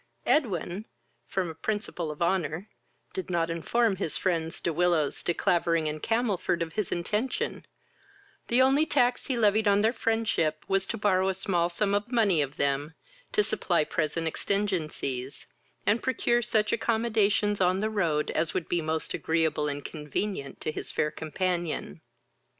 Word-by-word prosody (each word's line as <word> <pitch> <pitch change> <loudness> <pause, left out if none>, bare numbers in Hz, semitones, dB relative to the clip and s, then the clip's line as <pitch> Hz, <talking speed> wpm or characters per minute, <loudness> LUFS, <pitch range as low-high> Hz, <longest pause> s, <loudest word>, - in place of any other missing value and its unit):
Edwin, 195 - 0 0.4
from 190 -2 -1
a 165 - -5
principle 180 -2 -3
of 150 +2 -3
honour, 175 +1 0 0.5
did 190 - -4
not 170 -2 0
inform 205 +5 +1
his 170 -5 -1
friends, 165 -3 -1
De 170 - -1
Willows, 170 -3 +2
De - - 0
Clavering 165 -2 +1
and 150 0 -4
Camelford, 215 -7 0
of 165 -1 -8
his 210 -4 -2
intention; 210 +9 -2 0.8
the 245 +2 +5
only 270 +3 +4
tax 245 -5 +2
he 260 - 0
levied 215 -1 +3
on 200 0 +4
their 225 +2 +3
friendship 220 -10 0
was 195 0 +2
to 230 - -3
borrow 190 -2 +2
a 190 - -1
small 175 -3 +1
sum 200 +3 0
of 205 +4 -1
money 205 -9 +3
of 140 0 -3
them 140 +3 0 0.4
to 420 - +3
supply 175 - +1
present 160 +1 -1
exigencies, 155 -8 -2 0.4
and 220 +3 +3
procure 240 -2 +1
such 215 -2 +1
accommodations 215 -3 +1
on 185 +1 +3
the 215 - 0
road 165 -8 0
as 160 +1 -1
would 170 - -1
be 175 - 0
most 160 0 -2
agreeable 160 -2 +1
and 145 0 -4
convenient 150 0 -4
to 155 - -2
his - - -5
fair 150 - 0
companion. 160 - -3
180 Hz, 160 wpm, -28 LUFS, 160-210 Hz, 0.8 s, the